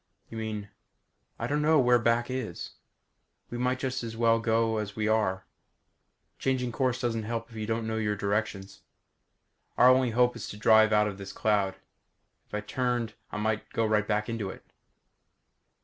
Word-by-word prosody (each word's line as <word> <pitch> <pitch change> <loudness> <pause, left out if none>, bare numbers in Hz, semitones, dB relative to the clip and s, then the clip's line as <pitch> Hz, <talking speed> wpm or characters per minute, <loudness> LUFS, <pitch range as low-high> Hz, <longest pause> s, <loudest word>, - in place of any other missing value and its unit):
"You 115 - -6
mean 105 -2 -5 0.3
?" - - -45
"I - - -2
don't 145 +1 0
know 155 +1 +4
where 125 -2 +5
back 120 +2 +1
is. 125 -9 -4 0.8
We 120 - -4
might 125 +1 +1
just 130 0 -2
as 115 -1 -6
well 115 0 +4
go 115 0 +1
as 105 -1 -4
we 110 -1 -1
are. 100 -4 +1 0.9
Changing 130 -2 0
course 130 0 0
doesn't 120 -3 -1
help 115 +1 -4
if - - -13
you 110 -1 -4
don't 115 0 -1
know 110 0 -2
your 105 -1 0
directions. 100 -1 -2 1.0
Our 125 - +7
only 130 -1 +4
hope 125 +1 +2
is 115 - -6
to 105 - -7
drive 110 +1 +5
on 105 -1 +5
out 105 - +2
of 100 -1 -6
this 100 0 -7
cloud. 100 -2 +1 0.7
If - - -7
I 105 - -1
turned 120 0 -1 0.2
I - - -4
might 105 0 -1
go 115 - +1
right 105 -1 +1
back 105 0 0
into 115 -4 -3
it." - - -10
110 Hz, 185 wpm, -28 LUFS, 105-120 Hz, 1.0 s, Our